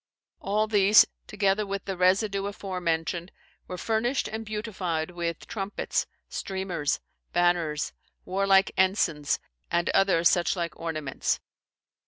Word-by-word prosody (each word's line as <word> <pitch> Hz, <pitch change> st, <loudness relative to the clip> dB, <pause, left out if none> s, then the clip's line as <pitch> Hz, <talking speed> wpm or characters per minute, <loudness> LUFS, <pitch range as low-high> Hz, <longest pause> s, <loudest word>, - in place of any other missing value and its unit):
All 210 Hz, +2 st, +1 dB
these, 210 Hz, -1 st, +6 dB, 0.2 s
together 205 Hz, 0 st, +1 dB
with 200 Hz, -1 st, -4 dB
the 195 Hz, -, -3 dB
residue 195 Hz, +2 st, +2 dB
aforenamed, 175 Hz, -3 st, -2 dB, 0.4 s
were 180 Hz, -, -5 dB
furnished 230 Hz, +7 st, 0 dB
and 220 Hz, +1 st, -5 dB
beautified 190 Hz, -7 st, -3 dB
with 170 Hz, -2 st, -4 dB
trumpets, 200 Hz, -1 st, -2 dB, 0.2 s
streamers, 185 Hz, -7 st, -2 dB, 0.3 s
banners, 175 Hz, -4 st, +1 dB, 0.3 s
warlike 195 Hz, +1 st, +3 dB
ensignes, 175 Hz, -6 st, +2 dB, 0.3 s
and 170 Hz, 0 st, +1 dB
other 195 Hz, -4 st, +3 dB
such 175 Hz, +2 st, +3 dB
like 170 Hz, -2 st, -3 dB
ornaments. 155 Hz, -4 st, -2 dB
190 Hz, 110 wpm, -27 LUFS, 170-200 Hz, 0.4 s, these